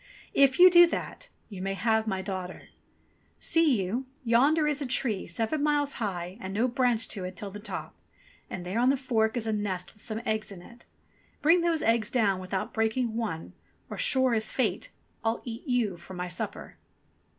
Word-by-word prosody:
If 275 -1 +4
you 365 +1 +9
do 345 0 +9
that, - - -5 0.2
you 195 -4 -8
may 195 +1 -2
have 220 +1 +1
my 190 -2 -1
daughter. 185 -2 -6 0.7
See 315 -8 +3
you, 240 +8 -3 0.2
yonder 280 +7 +4
is 295 -1 0
a 275 - -2
tree, 230 -5 -1
seven 225 - -1
miles 290 -1 +1
high, 185 -1 -3
and 190 +1 -5
no 230 +4 +2
branch 245 -2 +1
to 195 - -4
it 185 - -5
till 205 -3 -6
the 205 - -8
top, 210 - -6 0.6
and 180 -1 -6
there 190 +6 -1
on 250 +2 +4
the 275 - +3
fork 235 -3 0
is 230 - -2
a 220 - 0
nest 195 -3 -3
with 210 - -22
some 220 +1 -4
eggs 215 -1 -1
in 180 -3 -10
it. 235 +4 -16 0.6
Bring 335 +4 +5
those 335 -2 +1
eggs 225 -1 +2
down 205 -7 +2
without 190 +4 -4
breaking 225 +1 0
one, 210 -9 -4 0.4
or, - - -5
sure 260 -2 +3
as 220 -1 0
fate, 260 - -1 0.3
I'll 225 0 -1
eat 235 +4 -7
you 235 -8 +1
for 175 +2 -11
my 180 0 -4
supper." 175 - -5
225 Hz, 195 wpm, -28 LUFS, 195-260 Hz, 0.7 s, you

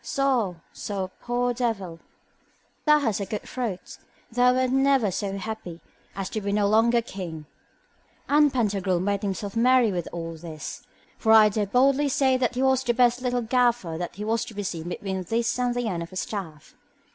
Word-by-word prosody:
So, 255 -9 0 0.2
so 190 -2 -4
poor 245 0 0
devil, 205 -9 -3 0.9
thou 300 -1 +6
hast 225 -7 0
a 200 - -2
good 210 +1 -4
throat; 230 -8 -5 0.3
thou 245 +2 +4
wert 255 0 +1
never 270 -5 +3
so 195 +1 -3
happy 195 -5 -6 0.4
as 195 -1 -3
to 215 - -3
be 200 0 -2
no 205 0 +2
longer 230 +3 +3
king. 170 -8 -7 0.8
And 295 0 +4
Pantagruel 200 -7 0
made 200 +2 -1
himself 200 0 -4
merry 245 -1 +4
with 175 -3 -3
all 165 -1 -5
this; 160 -2 -8 0.4
for 220 - +2
I 220 -1 +8
dare 210 0 -1
boldly 275 +6 +3
say 265 -1 +2
that 255 -1 0
he 255 - 0
was 265 -1 +3
the 240 -2 0
best 245 0 +3
little 245 -1 -1
gaffer 240 -7 +1
that 175 +1 -5
was 220 +2 -1
to 220 - -11
be 205 - -3
seen 170 -3 -4
between 190 +1 -4
this 230 +6 -1
and 245 -1 0
the 245 -1 -1
end 175 -5 -2
of 170 - -7
a - - -11
staff. 185 -7 -6
220 Hz, 185 wpm, -25 LUFS, 190-245 Hz, 0.9 s, I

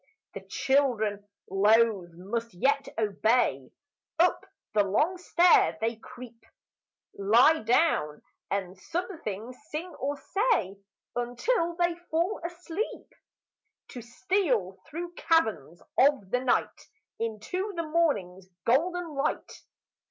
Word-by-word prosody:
The - - -6
children, 220 -7 0 0.2
loath, 205 -1 +3
must 220 +5 -5
yet 275 +8 +1
obey; 215 - +1 0.5
Up 350 +2 +2 0.3
the 210 -1 +4
long 300 - +1
stair 345 - +4
they 230 +1 -1
creep; 240 0 -12 0.7
Lie 235 +11 +5
down, 220 - +1 0.3
and 190 -2 -2
something 250 - -5 0.2
sing 335 +3 -5
or 285 +2 -2
say 390 - 0 0.4
Until 330 - 0
they 345 0 +1 0.2
fall 345 +6 0
asleep, 350 +4 -5 0.8
To 245 - -8
steal 245 - -1
through 345 +3 -6
caverns 220 - 0 0.2
of 265 -8 +3
the 250 - +2
night 250 -1 0 0.3
Into 230 - -3
the 335 - -2
morning's 205 - 0 0.2
golden 350 +8 +1
light. 280 +1 -3
250 Hz, 105 wpm, -28 LUFS, 205-335 Hz, 0.8 s, Lie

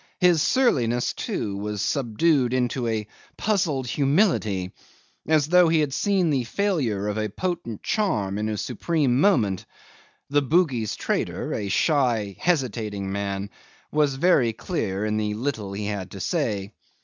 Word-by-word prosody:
His 175 -4 +4
surliness, 120 - +2
too, 100 -2 -3
was 105 +1 -4
subdued 130 - +1
into 120 -3 -1 0.3
puzzled 175 - 0
humility, 135 - +1 0.6
as 155 -2 +3
though 180 0 +6
he 160 0 +3
had 145 -3 -1
seen 185 +2 +1
the 135 -3 +1
failure 125 - -1
of 105 +1 -2
a 110 0 -1
potent 140 - -4
charm 105 - 0
in 110 +1 -1
a 105 - -2
supreme 130 - 0
moment. 110 - +2 0.6
The 145 0 +4
Bugis 135 - +1
trader, - - -2
a 100 - -3
shy 115 - +1
hesitating 110 - -1
man, 100 0 -3 0.4
was 150 -3 +2
very 135 -7 +3
clear 110 - -3
in 105 0 0
the 105 -1 -1
little 110 -4 -3
he 105 +1 -4
had 100 -3 -4
to 95 - -9
say. 105 - -2
120 Hz, 140 wpm, -24 LUFS, 105-155 Hz, 0.6 s, though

